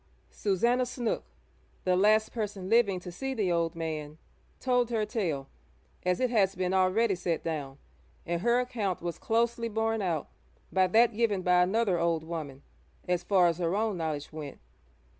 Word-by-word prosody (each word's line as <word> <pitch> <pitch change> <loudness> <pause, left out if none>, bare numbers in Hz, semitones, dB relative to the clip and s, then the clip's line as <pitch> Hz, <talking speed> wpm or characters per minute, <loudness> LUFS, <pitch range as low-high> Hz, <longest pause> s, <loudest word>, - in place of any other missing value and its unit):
Susannah 235 +6 +1
Snook, 240 -2 -2 0.6
the 185 -1 +2
last 215 +3 +3
person 205 -4 -4
living 215 -5 +3
to 180 0 -8
see 265 +9 -4
the 200 -6 0
old 170 0 0
man, 155 -2 -4 0.4
told 250 -2 +1
her 225 -3 0
tale 170 - -2 0.6
as 180 0 +1
it 255 -1 +1
has 195 -4 +3
been 185 0 -1
already 190 +4 +3
set 175 -3 -2
down, 145 -4 -4 0.5
and 170 0 -2
her 235 +3 +3
account 225 -9 -2
was 170 -1 -4
closely 230 +1 0
borne 225 0 0
out 170 -6 -1 0.4
by 185 -1 +3
that 225 +4 +4
given 210 -5 +1
by 180 0 +4
another 190 -1 +2
old 170 -2 +1
woman 155 -5 -6 0.4
as 180 -1 +1
far 185 0 +3
as 170 0 +1
her 170 +1 0
own 215 -1 0
knowledge 155 -3 -4
went. 150 -3 -7
185 Hz, 165 wpm, -29 LUFS, 170-225 Hz, 0.6 s, that